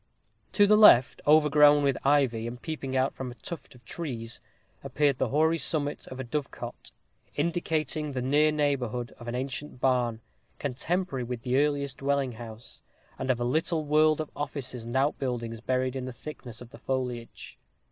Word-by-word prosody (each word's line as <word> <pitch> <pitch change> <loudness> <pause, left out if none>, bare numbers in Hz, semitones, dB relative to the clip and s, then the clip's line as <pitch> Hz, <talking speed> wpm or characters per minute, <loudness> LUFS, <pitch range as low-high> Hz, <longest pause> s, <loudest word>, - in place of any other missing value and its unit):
To 205 - +5
the 210 +1 +5
left, 140 - +7
overgrown 150 -1 +6
with 140 -1 +2
ivy, 135 -5 +2
and 120 +1 -7
peeping 140 -3 -5 0.2
from 130 -1 -6
out 120 - -11
a - - -34
tuft 170 -6 -8
of 120 -2 -19
trees, 120 -7 -5 0.4
appeared 145 -3 +1
the - - +1
hoary 160 +3 +2
summit 145 +1 -1
of 130 - -8
a - - -2
dovecot, 140 +3 -5 0.5
indicating 155 -2 -1
the 130 - -2
near 150 +4 +3
neighborhood 130 -6 -1
of 120 - -10
an 120 - -3
ancient 130 +2 -5
barn, 125 -3 +1 0.4
contemporary 145 +1 -2
with 120 -1 -5
the 130 0 +1
earliest 140 -2 0
dwelling 140 -1 0
house, 115 0 -10 0.4
and 130 - -3
of 125 -2 +2
a - - -1
little 160 +5 0
world 155 +1 +4
of 155 - -4
offices 130 -4 -5
and 120 +2 -6
outbuildings 125 -5 -1
buried 130 +1 -1
in 130 -1 -3
the 130 - -6
thickness 125 -4 -9
of 125 -1 -11
the - - -13
foliage. 125 -3 -4
135 Hz, 170 wpm, -28 LUFS, 125-150 Hz, 0.5 s, left